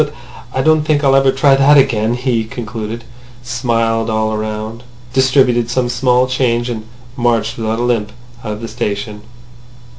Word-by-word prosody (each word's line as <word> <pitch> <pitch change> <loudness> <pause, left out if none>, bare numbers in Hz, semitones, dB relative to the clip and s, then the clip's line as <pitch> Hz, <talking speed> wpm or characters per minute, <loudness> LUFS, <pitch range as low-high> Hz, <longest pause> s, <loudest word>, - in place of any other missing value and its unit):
"But 150 0 -8 0.4
I 130 - -1
don't 155 +1 +4
think 150 -1 0
I'll 135 -1 +4
ever 135 0 +4
try 135 +1 +4
that 140 +2 +5
again," 115 -4 +2
he 125 -2 0
concluded; 115 -1 -6 0.4
smiled 115 -2 -1
all 110 0 0
round; 110 +1 -5 0.3
distributed 130 -3 +3
some 120 0 0
small 125 0 +2
change, 125 -2 0
and 110 -2 -6 0.3
marched 115 -3 0
without 110 -1 -2
a 120 - -1
limp 115 -4 0 0.3
out 105 -2 -3
of 105 - -8
the 115 - -5
station. 105 -2 -4
120 Hz, 160 wpm, -16 LUFS, 110-130 Hz, 0.4 s, that